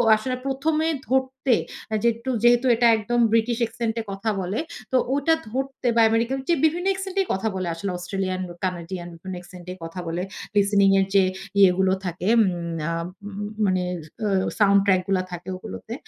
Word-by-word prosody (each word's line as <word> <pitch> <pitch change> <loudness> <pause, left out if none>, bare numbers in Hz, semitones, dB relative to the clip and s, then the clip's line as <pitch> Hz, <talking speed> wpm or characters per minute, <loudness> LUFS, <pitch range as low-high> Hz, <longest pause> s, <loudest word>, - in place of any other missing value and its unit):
আসলে 255 +4 -2
১ম 275 +4 0
এ - - +2 0.2
ধরতে 265 -1 +2 0.3
অ্যা 220 - 0
যেট্টু 235 +2 0
যেহেতু 240 +1 +5
এটা 235 +1 +4
একদম 240 +3 -1
ব্রিটিশ 230 +1 +2
অ্যাক্সেন্টে 230 0 -1
কথা 195 +3 -2
বলে, 190 +4 -2 0.3
তো 260 - +4 0.2
ওটা 285 +3 +3 0.2
ধরতে 265 +1 -3
বা 230 - +5
আমেরিকান 230 +4 +1
যে 340 - +5
বিভিন্ন 350 +4 +1
অ্যাক্সেন্ট 385 0 -3
এই 380 - -2
কথা 195 +4 -1
বলে 185 -2 -2
আসলে 190 +3 -3
অস্ট্রেলিয়ান 185 +1 -3
ও - - -8
কানাডিয়ান 175 0 -4
মানে 185 -1 -5
অ্যাক্সেন্ট 180 0 -12
এ - - -10
কথা 165 +2 -6
বলে। 170 +2 -2 0.3
listening 200 -1 +4
এর 195 - +3
যে 195 - +7 0.4
ইয়েগুলো 190 0 +5
থাকে 180 +1 -3
উম 175 -4 0 0.2
আ - - -1 0.4
উ - - -5
উ 210 +1 -3
মানে 185 -1 +1 0.4
অ - - +2 0.3
সাউন্ড 200 -1 +5
ট্র্যাক 185 -2 +4
গুলা 190 -2 +1
থাকে 175 0 -7
ঐগুলোতে। 220 +3 -8
210 Hz, 185 wpm, -24 LUFS, 185-240 Hz, 0.4 s, যে